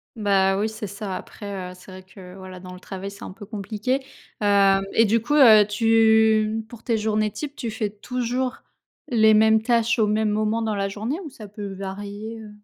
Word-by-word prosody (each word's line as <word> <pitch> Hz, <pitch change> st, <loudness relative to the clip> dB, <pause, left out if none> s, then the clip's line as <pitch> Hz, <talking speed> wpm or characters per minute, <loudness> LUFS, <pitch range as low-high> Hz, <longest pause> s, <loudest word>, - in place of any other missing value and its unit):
Bah 195 Hz, -3 st, +2 dB
oui, 210 Hz, +2 st, 0 dB
c'est 220 Hz, -1 st, -6 dB
ça 200 Hz, 0 st, -6 dB
après, 195 Hz, -3 st, -7 dB
heu, -, -, -10 dB
c'est 180 Hz, +1 st, -15 dB
vrai 185 Hz, 0 st, -11 dB
que 185 Hz, -1 st, -13 dB
voilà 185 Hz, -1 st, -10 dB
dans 180 Hz, 0 st, -10 dB
le 180 Hz, -, -11 dB
travail 195 Hz, +1 st, -7 dB
c'est 200 Hz, -, -12 dB
un -, -, -7 dB
peu 205 Hz, +2 st, -11 dB
compliqué, 215 Hz, +5 st, -2 dB, 0.4 s
hem, 200 Hz, -1 st, +4 dB
et 225 Hz, -, +5 dB
du 225 Hz, +2 st, +2 dB
coup, 240 Hz, +6 st, -1 dB
heu, 220 Hz, -7 st, +8 dB
tu 220 Hz, 0 st, +3 dB
pour 230 Hz, -1 st, -13 dB
tes 230 Hz, -2 st, 0 dB
journées 215 Hz, 0 st, 0 dB
types 290 Hz, +6 st, -6 dB
tu 235 Hz, -, -4 dB
fais 215 Hz, -2 st, -3 dB
toujours 250 Hz, +4 st, -3 dB, 0.4 s
les 220 Hz, -2 st, +4 dB
mêmes 220 Hz, 0 st, +4 dB
tâches 235 Hz, 0 st, +1 dB
au 215 Hz, -, +3 dB
même 215 Hz, +1 st, +1 dB
moment 215 Hz, +2 st, 0 dB
dans 220 Hz, -1 st, -1 dB
la 195 Hz, 0 st, -1 dB
journée 220 Hz, -, -4 dB
ou 310 Hz, -, -7 dB
ça 220 Hz, -5 st, -11 dB
peut 205 Hz, -1 st, -7 dB
varier, 205 Hz, +3 st, -7 dB
heu? 220 Hz, -1 st, -10 dB
215 Hz, 210 wpm, -23 LUFS, 200-225 Hz, 0.4 s, heu